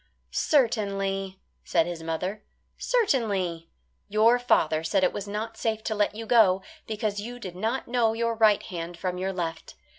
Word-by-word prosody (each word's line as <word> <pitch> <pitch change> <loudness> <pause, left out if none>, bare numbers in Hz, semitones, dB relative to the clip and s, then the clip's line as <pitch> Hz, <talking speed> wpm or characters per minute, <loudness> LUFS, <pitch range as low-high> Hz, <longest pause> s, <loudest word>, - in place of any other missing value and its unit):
"Certainly," 195 -7 0 0.2
said 165 -2 +2
his 175 -1 -5
mother, 170 +6 -3 0.3
"certainly. 200 - 0 0.4
Your 220 +4 +4
father 160 -10 +2
said 185 +4 +1
it 180 - +3
was 205 0 -5
not 220 +2 -4
safe 220 -1 -1
to 220 - -1
let 210 0 0
you 225 +1 -6
go, 205 -5 +4 0.2
because 210 -1 -2
you 240 +3 -7
did 185 -7 -8
not 225 +7 -2
know 235 -2 +2
your 230 0 0
right 215 -2 +4
hand 170 -1 -6
from 180 +1 -3
your 190 +1 -1
left. 170 -3 -5
205 Hz, 160 wpm, -27 LUFS, 180-225 Hz, 0.4 s, Your